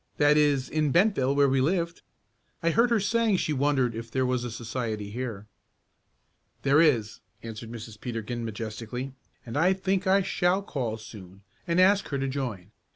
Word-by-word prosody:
"That 145 0 +5
is 145 -3 +3
in 155 -2 0
Bentville 170 -7 +3
where 140 0 +5
we 135 0 +2
lived. 170 +3 0 0.6
I 170 - +3
heard 230 +6 +3
her 230 -2 +3
saying 220 0 +2
she 155 - -1
wondered 135 -3 +1
if 115 +1 -7
there 130 +2 0
was 125 -1 0
a 120 - -3
society 110 -2 -4
here." 115 -3 -5 1.2
"There 140 +3 +5
is," 120 -10 +2 0.2
answered 115 0 -7
Mrs. 110 -2 -9
Peterkin 120 -1 -4
majestically, 115 +4 -5 0.3
"and 115 - -7
I 180 +6 +4
think 190 0 -1
I 195 +1 +4
shall 180 +2 +1
call 120 - -3
soon, 100 -3 -12 0.2
and 170 +1 +1
ask 195 +2 +4
her 140 - -2
to 135 0 -1
join. 120 -8 -4
130 Hz, 170 wpm, -27 LUFS, 115-170 Hz, 1.2 s, That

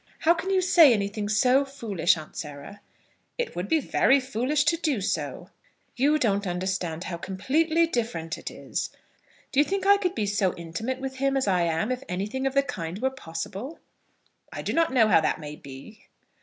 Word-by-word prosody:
"How 330 - +5
can 345 +3 -4
you 380 -1 +3
say 335 -5 +7
anything 205 0 -2
so 250 +6 +4
foolish, 215 -12 0
Aunt 155 -1 -10
Sarah?" 150 +6 -8 0.6
"It 485 -1 -3
would 180 +3 -3
be 320 - +3
very 275 0 +3
foolish 265 +3 0
to 305 +3 +3
do 305 -8 0
so." 195 - -3 0.4
"You 285 +4 +3
don't 205 -7 0
understand 180 -2 -2
how 175 -2 -5
completely 300 - +1
different 220 - -3
it - - -7
is. - - -4 0.6
Do 275 - +1
you - - +7
think 390 +5 -2
I 400 0 +7
could 365 -3 -2
be 215 - 0
so 200 -2 0
intimate 170 +10 -4
with 265 0 -5
him 275 +1 +1
as 265 - 0
I 185 -2 +2
am 165 +8 0
if 255 0 -2
anything 210 +9 -2
of 270 - -3
the 275 - +4
kind 180 -8 -5
were 265 +2 0
possible?" 205 - -6 0.7
"I - - -6
do - - -2
not 330 -3 +2
know 240 -4 +4
how 185 - +5
that 160 - 0
may 150 -1 -7
be." 140 +11 -12
230 Hz, 195 wpm, -26 LUFS, 185-275 Hz, 0.7 s, say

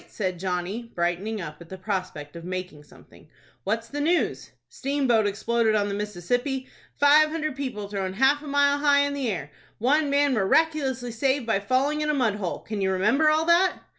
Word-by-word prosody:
said 185 -4 -4
Johnny, 190 +6 -3
brightening 175 +5 -1
up 155 -3 -7
at 170 - -13
the 190 - -7
prospect 185 -6 -4
of 170 - -8
making 180 -4 -6
something. 145 - -19 0.4
"What's 225 +3 -1
the 290 +4 -4
news?" 335 +4 0 0.2
"Steamboat 265 -6 +1
exploded 220 +2 +1
on 205 -1 +1
the - - -3
Mississippi! 245 - -2 0.3
Five 300 +2 +6
hundred 310 -3 -3
people 255 -7 -4
thrown 195 -2 -3
half 270 +7 +3
a 300 - -10
mile 285 0 +2
high 285 -1 +4
in 285 0 0
the 275 -4 -2
air! 150 -8 -4 0.3
One 285 +6 +2
man 285 0 +3
miraculously 260 +2 +1
saved 265 +2 0
by 225 -4 +1
falling 265 +8 0
in 300 - -1
a 300 - +1
mud 240 -6 +2
hole! 185 -4 -4
Can 210 -2 -5
you 190 0 +1
remember 225 +12 +3
all 310 +1 +2
that?" 350 +2 +3
235 Hz, 190 wpm, -25 LUFS, 190-285 Hz, 0.4 s, Five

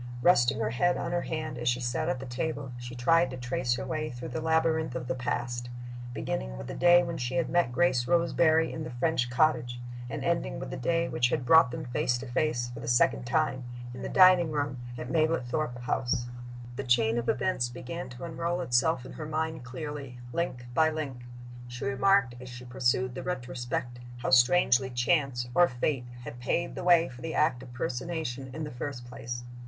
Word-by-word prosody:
Resting 120 -11 +5
her 110 0 0
head 175 +9 +2
on 170 - -3
her 175 0 +1
hand 155 -6 -4
as 120 0 +1
she 120 +1 +1
sat 125 0 -1
at 130 - -1
the 135 - -6
table, 135 +2 -3
she 120 0 -7
tried 165 +8 +3
to 130 - -6
trace 120 0 -1
her - - -4
way 155 -1 -2
through 125 0 -7
the 140 +6 -3
labyrinth 160 -3 +1
of 125 -1 -4
the 130 - 0
past, 120 -1 -3 0.4
beginning 60 - -3
with 60 - -7
the - - -6
day 175 0 +6
when 170 -1 -4
she 125 +1 -2
had 170 - 0
met 175 -8 +2
Grace 125 -4 +2
Roseberry 165 -1 +3
in 160 - -4
the - - -5
French 120 0 0
cottage, 120 -3 +1 0.3
and 140 +3 -4
ending 170 -4 0
with 135 - -6
the - - -3
day 165 +6 0
which 120 0 +1
had 125 - -1
brought 160 0 +7
them 125 - -5
face 125 0 0
to 130 - -7
face, 120 -1 -1
for 115 - -8
the 115 - -7
second 120 0 +3
time, 130 -2 +1 0.3
in 125 - -8
the - - -4
dining 185 -3 +6
room 145 -4 -2 0.2
at 120 - -6
Mablethorpe 155 -4 0
House. 120 0 0 0.5
The 135 - -2
chain 120 -2 +3
of 120 - -3
events 125 -10 +1
began 130 +4 -6
to 120 +1 -10
unroll 170 +1 -2
itself 125 -1 +2
in - - -9
her 155 - -6
mind 160 -2 -2
clearly, 135 0 -6 0.2
link 125 -7 -2
by 160 +5 +4
link. 140 -6 -5 0.4
She 120 0 -6
remarked, 135 +1 +3
as 125 - -9
she 125 0 -9
pursued 125 0 0
the 130 - -5
retrospect, 125 -5 -4 0.2
how 120 - -2
strangely 130 0 +5
Chance, 125 0 +1
or 175 +4 +6
Fate, 125 0 -1 0.2
had 120 - -8
paved 170 +7 -1
the - - -5
way 175 -2 +5
for 125 -1 -11
the 165 - -4
act 130 -5 +2
of 130 -2 -11
personation, 130 +1 -3
in 155 +4 -5
the 150 - -5
first 125 0 -5
place. 120 0 -6
130 Hz, 205 wpm, -29 LUFS, 120-160 Hz, 0.5 s, brought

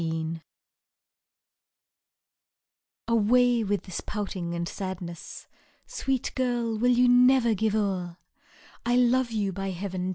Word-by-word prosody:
SONG. 160 0 -3 2.7
Away 235 +1 +3
with 205 -1 -1
this 185 -3 -6
poutJAg 185 -5 -4
and 170 0 -3
sadness! 180 -3 -7 0.4
Sweet 270 - -2
girl! 240 -3 -1
will 245 +2 +3
you 250 0 +4
never 245 -1 +5
give 215 +1 0
o'er? 185 -5 -2 0.7
I 240 +1 +1
love 250 +1 +3
7oU| 210 -4 -2
by 195 +1 -4
Heaven 185 0 -4
210 Hz, 110 wpm, -27 LUFS, 185-245 Hz, 2.7 s, never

